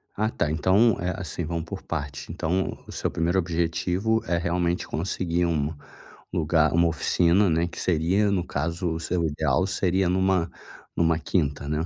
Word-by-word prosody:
Ah 110 +1 +1
tá, 75 - -1
então, 95 +9 +3
eh, 90 +1 -1
assim, 90 -2 -4
vamos 85 0 -3
por 95 +3 -7
partes, 70 -4 -5
então 90 +4 -1
o - - -9
seu - - -2
primeiro 85 +3 0
objetivo 90 +5 0
é, 85 - 0
realmente, 85 +1 -1
conseguir 85 0 -1
um 80 -2 -1 0.6
lugar 80 -1 +2
uma 85 0 +4
oficina, 85 +4 +3
né, 85 +1 +1
que 85 - -7
seria, 95 +5 +2
no 90 -3 0
caso, 85 +5 -2
o 80 - -4
seu 85 0 -1
ideal 80 +2 +1
seria 95 -1 +1
numa 95 -2 +2 0.5
numa 80 -1 +2
quinta 75 -5 -1
né. 75 +2 -1
85 Hz, 165 wpm, -25 LUFS, 80-95 Hz, 0.6 s, uma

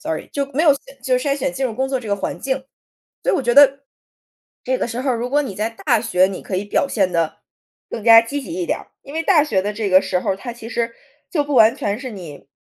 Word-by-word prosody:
Sorry， 320 +1 -4
就 280 -1 -1
没 300 +5 +1
有 300 -4 +6 0.3
就 255 0 +1
是 270 - -3
筛 275 - +1
选 270 -1 -2
进 265 0 -1
入 225 - -5
工 265 +2 -1
作 265 -1 -1
这 235 - -9
个 200 - +1
环 200 - -4
境， 270 0 -1 0.7
所 - - +1
以 - - +2
我 270 - -1
觉 240 - +2
得， 275 0 +6 0.8
这 260 - 0
个 250 - -2
时 245 +2 -4
候 260 -1 0
如 240 +1 -3
果 290 +2 +2
你 255 - -5
在 215 +2 -1
大 230 0 0
学 185 -5 +3
你 190 0 -5
可 190 - -4
以 195 - -2
表 240 +6 0
现 195 -8 0
得 165 -2 0 0.6
更 225 - -5
加 225 0 +9
积 280 +5 -3
极 300 - -9
一 360 - -2
点 - - -1
儿。 - - -14 0.2
因 280 - -11
为 325 - -1
大 325 -4 +4
学 200 -11 0
的 205 +2 -2
这 210 -1 -3
个 185 0 +5
时 180 -2 -1
候， 190 - -1
它 240 +5 -7
其 230 -1 -10
实 235 0 -2 0.4
就 295 -4 0
不 290 - -4
完 225 -3 +6
全 205 +3 -2
是 260 -1 -6
你， 170 -10 -10
240 Hz, 315 characters per minute, -20 LUFS, 210-275 Hz, 0.8 s, 加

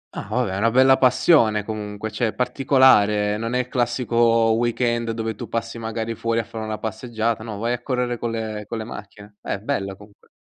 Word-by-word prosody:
Ah, - - -6
vabbè, 120 -2 0
è - - -2
una 115 +3 +2
bella 130 +2 +5
passione, 125 -4 +4
comunque, 105 0 -5
cioè 115 +2 0
è 110 - -3
particolare, 105 -6 +3
non 115 +2 -3
è - - +2
il 125 - -7
classico 120 -1 -1 0.4
weekend 120 0 0
dove 115 0 -2
tu 110 +1 -8
passi 115 0 -4
magari 115 0 -3
fuori 115 +1 -2
a 115 - +1
fare 115 0 -7
una 110 0 -4
passeggiata, 110 +1 -3
no, 110 -2 -6
vai 115 +3 -1
a 125 - -4
correre 125 -2 -2
con 120 - -2
le 110 -2 -4
con 115 - -4
le 110 - -4
macchine. 105 -1 -11
Eh! 100 - -3
Bello, 100 -4 -3
comunque. 105 +1 -19
115 Hz, 205 wpm, -22 LUFS, 105-120 Hz, 0.4 s, bella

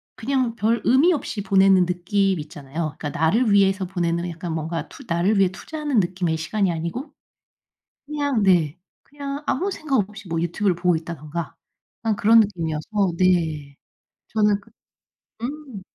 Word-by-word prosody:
그냥 255 -1 -1
별 230 +1 +1
의미 275 +8 +5
없이 250 -8 -3
보내는 190 -1 +4
느낌 185 +1 0
있잖아요. 150 0 -5
그러니까 150 - -4
나를 205 - +2
위해서 195 -1 +3
보내는 175 -1 -1
약간 170 +1 -6
투 - - -2
뭔가 160 -1 -4 0.2
나를 180 +5 +2
위해 190 -2 +4
투자하는 295 +4 -2
느낌의 175 -3 0
시간이 190 +4 0
아니고. 170 - -4 0.9
그냥 285 -5 -1
네. 175 -5 +3 0.3
그냥 280 0 -6
아무 380 +8 0
생각 310 -7 -1
없이 210 -1 -12
뭐 165 0 -1
유튜브를 180 +2 0
보고 175 0 +2
있다든가 160 0 -5 0.5
그냥 225 -2 0
그런 225 +3 +6
느낌이어서 180 0 -1
네. 160 -6 +1 0.5
저는 210 -2 +2
그 200 - -21 0.7
음. 265 -4 -6
190 Hz, 325 characters per minute, -23 LUFS, 170-225 Hz, 0.9 s, 그런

